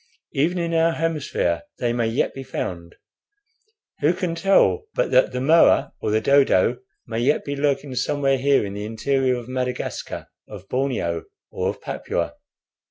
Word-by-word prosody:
Even 165 +7 +1
in 170 -1 -1
our 165 0 +3
hemisphere 150 - -1 0.2
they 120 -1 0
may 120 -1 0
yet 115 +4 0
be 135 - -7
found. 85 -10 -5 1.0
Who 160 +4 +2
can 175 -2 -2
tell 195 - +3
but - - 0
that - - +4
the 125 - -3
moa 155 +6 +4
or - - -1
the 110 +1 +2
dodo 125 -3 +3 0.3
may 115 -1 -3
yet 135 +5 +1
be 140 - -3
lurking 140 -1 -1
somewhere 135 +1 +1
here 135 -4 +3
in 100 - -6
the 105 0 -5
interior 130 +4 0
of 120 -1 -7
Madagascar, 125 -1 -4 0.2
of 100 -2 -11
Borneo, 125 -11 -1 0.3
or - - -1
of - - -6
Papua?" - - -3
135 Hz, 165 wpm, -23 LUFS, 115-150 Hz, 1.0 s, that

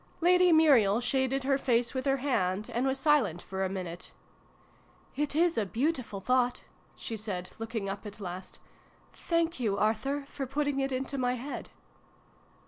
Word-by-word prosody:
Lady 360 +1 +5
Muriel 265 -10 +5
shaded 265 +2 0
her 275 0 +2
face 240 -2 +1
with 260 +1 -2
her 270 0 +3
hand, 210 -7 -1
and 245 +3 +1
was 265 0 0
silent 270 - +3
for 190 +2 -4
a 190 - 0
minute. 180 -3 -6 0.5
" - - -32
It 290 - -2
is 335 -3 +3
a 215 - 0
beautiful 245 - -1
thought," 250 +4 +1 0.3
she 225 - -5
said, 200 -4 -4
looking 225 -2 -3
up 195 +1 -4
at 205 +1 -10
last. 185 -1 -7 0.3
" - - -32 0.2
Thank 335 -3 +1
you 210 -5 0
Arthur, 270 +7 0
for 275 -2 -5
putting 285 +1 -1
it 270 0 0
into 265 +2 -2
my 250 0 +1
head 265 +4 -6
255 Hz, 170 wpm, -30 LUFS, 205-280 Hz, 0.5 s, Lady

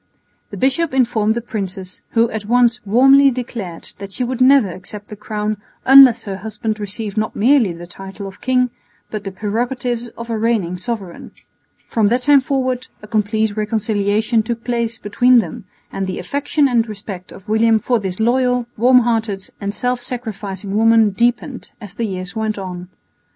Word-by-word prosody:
The - - -8
bishop 270 +3 +1
informed 225 -4 +2
the 235 - -2
princess, 190 -4 -6
who 230 0 +4
at 215 -2 -4
once 240 0 +3
warmly 270 +6 +6
declared 230 -9 -6
that 200 -1 -8
she 250 - -2
would 255 +1 -3
never 260 -5 +5
accept 200 +4 -9
the 210 - -7
crown 210 0 -3 0.3
unless 260 -3 +8
her 195 -2 -5
husband 215 +2 -4
received 210 +1 -4
not 215 0 -1
merely 240 -3 +3
the 170 +1 -9
title 195 +3 -9
of 195 0 -10
king, 250 -1 +1 0.4
but 210 -1 -5
the 195 - -4
prerogatives 240 +4 -2
of 235 0 -6
a 225 - -1
reigning 215 -6 0
sovereign. 190 -2 -6 0.5
From 220 -3 +1
that 245 +4 +1
time 285 -1 +6
forward 255 -1 -1 0.2
a - - -9
complete 215 0 0
reconciliation 215 +1 0
took 230 +1 -4
place 235 -2 -2
between 245 +5 +3
them, 180 -5 -2 0.3
and 195 -1 -3
the 185 - -4
affection 285 +1 0
and 235 -3 +1
respect 195 -3 -8
of 195 - -13
William 220 +1 +3
for 240 +2 0
this 190 -2 -4
loyal, 250 +1 +2
warm 250 +3 +5
hearted 225 -5 -2
and 200 0 -2
self 245 +3 -2
sacrificing 210 -6 -5
woman 225 -1 +4
deepened 240 +5 -1
as 205 -5 -10
the 230 +2 -2
years 185 -1 -5
went 220 -1 -2
on. 180 -2 -7
220 Hz, 170 wpm, -18 LUFS, 200-245 Hz, 0.5 s, unless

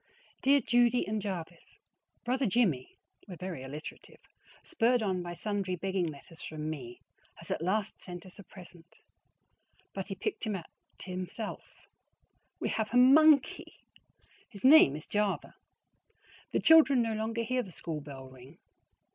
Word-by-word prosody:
Dear 280 +1 +4
Judy 240 0 +2
and 215 0 -2
Jervis: 175 -4 -7 0.5
Brother 255 +1 +1
Jimmie 185 - 0 0.3
(we 185 - -8
are - - -15
very 180 -6 -6
alliterative!), 145 +4 -9 0.5
spurred 245 -7 +1
on 190 -3 -1
by 175 0 -6
sundry 195 -1 -2
begging 190 0 -1
letters 155 +2 -10
from 155 0 -5
me, 125 -6 -8 0.3
has - - -10
at - - -2
last 200 +4 -1
sent 175 -1 -9
us 185 +2 -13
a - - -9
present; 175 -3 -15 1.0
but - - -5
he - - -5
picked 400 - -4
it 210 - -1
out 175 -4 -6 0.4
himself. 185 +4 -7 0.7
WE - - -2
HAVE 220 -2 -1
A - - +4
MONKEY! 280 +2 +5 0.7
His 200 -4 -13
name 260 - +7
is 150 - -8
Java. 210 -1 -1 1.0
The - - +1
children 300 -6 +6
no 225 -1 -1
longer 225 +2 -2
hear 255 +2 0
the 195 - -10
school 160 -2 -5
bell 135 -2 -10
ring. 130 +4 -15
195 Hz, 150 wpm, -30 LUFS, 165-235 Hz, 1.0 s, name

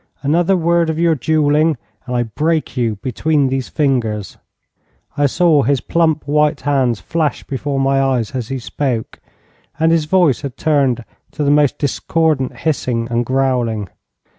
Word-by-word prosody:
Another 170 +6 +2
word 170 0 +2
of 160 - -2
your 170 0 +3
duelling, 155 +1 +2 0.3
and 125 - -3
I 120 - +1
break 155 +8 -1
you 115 -4 0
between 140 +2 +1
these 130 -1 -2
fingers.' 115 - -1 0.8
I 145 0 +2
saw 160 0 +3
his 135 +1 +1
plump 160 0 0
white 150 0 +2
hands 130 -5 +1
flash 155 - -2
before 140 +1 -3
my 135 0 +2
eyes 130 -5 0
as 125 -4 -4
he 135 - -3
spoke, 125 -1 -3 0.6
and 160 +1 +3
his 165 -2 +2
voice 155 -5 +2
had 140 -4 -6
turned 135 -6 +1 0.3
to 150 - -2
the 140 - +2
most 145 -2 +3
discordant 150 -1 0
hissing 125 -7 -1
and 120 0 +1
growling. 125 -6 0
140 Hz, 155 wpm, -17 LUFS, 125-155 Hz, 0.8 s, your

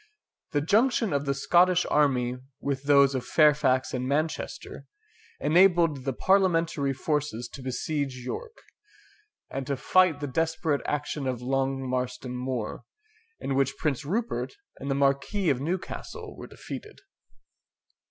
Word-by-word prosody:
The 145 - +2
junction 225 - +2
of 140 0 0
the 140 - +2
Scottish 180 +5 +4
army 125 -4 +2 0.2
with 140 -1 -3
those 140 -1 +5
of 130 -2 -2
Fairfax 140 -4 +3
and 125 0 -2
Manchester, 155 +4 -3 0.5
enabled 170 -5 +4
the 135 - +1
Parliamentary 165 -6 +2
forces 135 -4 -2
to 140 - -10
besiege 130 +2 -2
York, 460 - -6 0.9
and 135 -1 -4
to 140 - -1
fight 180 +2 +3
the 145 - -3
desperate 160 +1 0
action 150 -1 -2
of 125 -1 -3
Long 135 0 -1
Marston 125 0 -3
Moor, 125 -3 -4 0.6
in 135 - -2
which 135 0 +1
Prince 150 -5 -1
Rupert 225 - -2 0.2
and 140 - -5
the 135 - +1
Marquis 140 +6 +1
of 130 -1 -1
Newcastle 175 +5 -5
were - - -9
defeated. 425 -1 -9
140 Hz, 135 wpm, -27 LUFS, 130-165 Hz, 0.9 s, those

